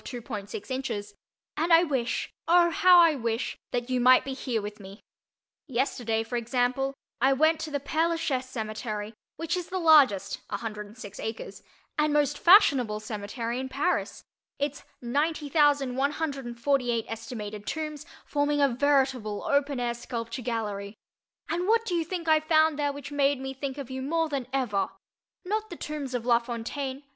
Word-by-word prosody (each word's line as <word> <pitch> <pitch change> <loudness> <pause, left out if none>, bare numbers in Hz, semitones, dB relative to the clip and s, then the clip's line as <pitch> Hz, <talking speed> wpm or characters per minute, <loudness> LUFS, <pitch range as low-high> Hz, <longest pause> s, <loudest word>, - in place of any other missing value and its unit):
6 225 -5 -6 0.2
inches, 225 -6 -3 0.4
and 330 +3 0
I 330 +1 +8
wish—oh, 335 +5 +1
how 360 +1 +6
I 335 -2 +5
wish—that 240 0 -3
you 255 - +2
might 255 +1 +6
be 270 - -3
here 255 -3 -2
with 210 0 -7
me. 195 +1 -11 0.7
Yesterday, 240 -4 -1
for 240 +2 -3
example, 250 +3 0 0.3
I 270 +2 +5
went 315 +3 +3
to 315 - -4
the 285 -1 -2
Père 320 +4 0
Lachaise 265 -6 -1
cemetery 215 -2 -4 0.2
which 330 +1 -1
is 360 -2 -4
the 375 - -3
largest 280 - +5
(106 210 -1 -6
acres) 220 0 -6 0.4
and 300 0 +3
most 290 -1 +1
fashionable 275 - +5
cemetery 225 +3 -4
in 260 0 -4
Paris, 295 +7 -1 0.3
its 285 0 -2 0.2
90,148 275 -3 +1
(est.) 225 0 -7 0.4
tombs 305 -2 -4 0.2
forming 290 0 0
a 280 -1 +4
veritable 260 -5 +1
open 280 -1 +1
air 240 -1 0
sculpture 235 +1 -5
gallery. 210 -4 -3 0.5
And 350 +2 -1
what 455 +1 +3
do 370 - -2
you 340 -1 +1
think 335 0 -5
I 315 -1 +5
found 315 -1 +3
there 290 -1 +1
which 280 0 -8
made 285 -1 +2
me 265 0 -5
think 270 0 -5
of 275 -3 -7
you 260 0 -4
more 325 +4 0
than 275 -4 -3
ever? 215 -8 0 0.6
Not 430 +3 -2
the 345 - -7
tombs 295 -5 -5
of 235 -1 -3
La 235 -1 +5
Fontaine 260 +3 -5
(d. - - -35
265 Hz, 155 wpm, -27 LUFS, 235-300 Hz, 0.7 s, I